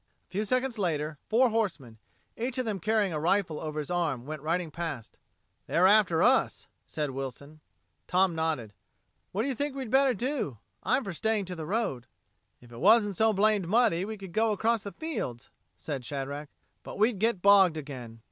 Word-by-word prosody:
A - - -48
few 205 +3 -1
seconds 255 +1 0
later, 155 -5 -1
four 240 +2 +4
horsemen, 155 - -2 0.4
each 245 +3 -3
of 255 - -1
them 210 -3 -2
carrying 210 -1 +1
a 155 - -1
rifle 170 -1 +1
over 155 -1 -5
his 150 +2 -4
arm, 155 -9 -1
went 155 0 -6
riding 165 +2 -1
past. 160 -9 -5 0.5
"They're 180 - +3
after 190 -4 +5
us," 260 +2 +2 0.2
said 150 -3 -3
Wilson. 135 +3 -7 0.5
Tom 185 0 +3
nodded. 160 -10 -2 0.6
"What 205 +4 -1
do - - -1
you 275 - 0
think 285 +3 -3
we'd 260 -5 -5
better 270 -2 +4
do? 240 - -2 0.2
I'm 275 - +1
for 195 - -5
staying 215 +3 0
to 180 0 -5
the 160 -2 -6
road." 190 - -2 0.5
"If 120 -1 -17
it 115 - -10
wasn't 205 0 +5
so 220 +4 +3
blamed 210 -2 +2
muddy 215 -4 +3
we 215 +2 -5
could 190 -3 -10
go 220 0 +2
across 220 +2 +1
the 200 - -7
fields," 210 - -5 0.3
said 135 +3 -5
Shadrack, 140 +2 -5 0.3
"but - - -9
we'd 215 0 +2
get 220 -4 +1
bogged 195 -5 +6
again." 125 -6 -8
185 Hz, 185 wpm, -28 LUFS, 150-220 Hz, 0.6 s, bogged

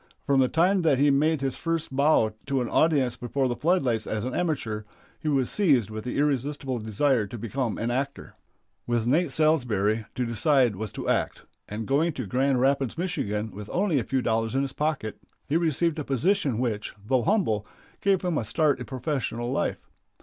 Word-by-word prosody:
From 140 -1 +3
the 130 - +4
time 180 +6 +2
that 155 -5 +3
he 145 +2 +4
made 150 +2 +2
his 135 -1 -2
first 165 -4 -2
bow 140 -6 +3
to 135 -1 +1
an 125 - -1
audience 140 -6 +2
before 130 +2 -1
the 120 - -1
footlights 130 - +1
as 110 +1 -2
an 130 - -3
amateur, 135 -11 -1 0.4
he - - -6
was 135 -4 +2
seized 140 - +3
with 110 +1 -6
the 125 - -3
irresistible 140 -2 -1
desire 110 +1 +1
to 120 - -7
become 115 +2 -2
an 115 +1 -1
actor. 140 +3 -3 0.5
With 120 -2 0
Nate 150 +5 +2
Salsbury 115 -9 +1
to 125 - -1
decide 120 0 +2
was 110 +2 -5
to - - -5
act, - - 0 0.3
and 110 +2 -4
going 155 +6 +1
to 130 -4 -4
Grand 130 +5 +1
Rapids, 135 +1 +1
Mich., 180 0 -2
with 105 0 -3
only 180 -6 +1
a - - -2
few 130 +3 -1
dollars 115 +1 0
in 135 - +2
his 135 -1 -4
pocket, 150 -8 -2 0.3
he 145 - -1
received 165 0 +1
a - - -2
position 140 - +1
which, 115 -4 -2
though 130 +3 +2
humble, 115 - +1 0.3
gave 195 -2 +2
him 175 -4 0
a - - -2
start 145 +4 +1
in 125 - -5
professional 125 -1 -3
life. - - -2
135 Hz, 195 wpm, -26 LUFS, 115-155 Hz, 0.5 s, the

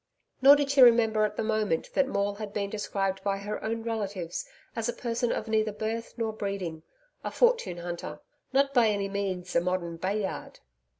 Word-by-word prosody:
Nor 275 +2 +9
did 285 -1 0
she 280 -1 +5
remember 225 -3 +6
at 210 0 -3
the - - 0
moment 215 -6 0
that 275 - +3
Maule 200 -5 0
had 205 0 -7
been 200 -1 -2
described 195 -2 -2
by 195 -1 0
her 205 +2 -5
own 225 +1 -2
relatives 200 -6 -3 0.3
as 230 0 -1
a - - -1
person 235 0 -1
of 220 - -2
neither 220 -1 +1
birth 220 +2 -4
nor 225 -2 -1
breeding 195 -6 -4 0.4
a - - -2
fortune 475 - +2
hunter 175 0 -6 0.3
not 275 +1 +2
by 240 -4 +5
any 200 -2 0
means 190 -3 -3
a 170 - +5
modern 175 -2 -2
Bayard. 190 +3 -3
210 Hz, 185 wpm, -28 LUFS, 195-230 Hz, 0.4 s, Nor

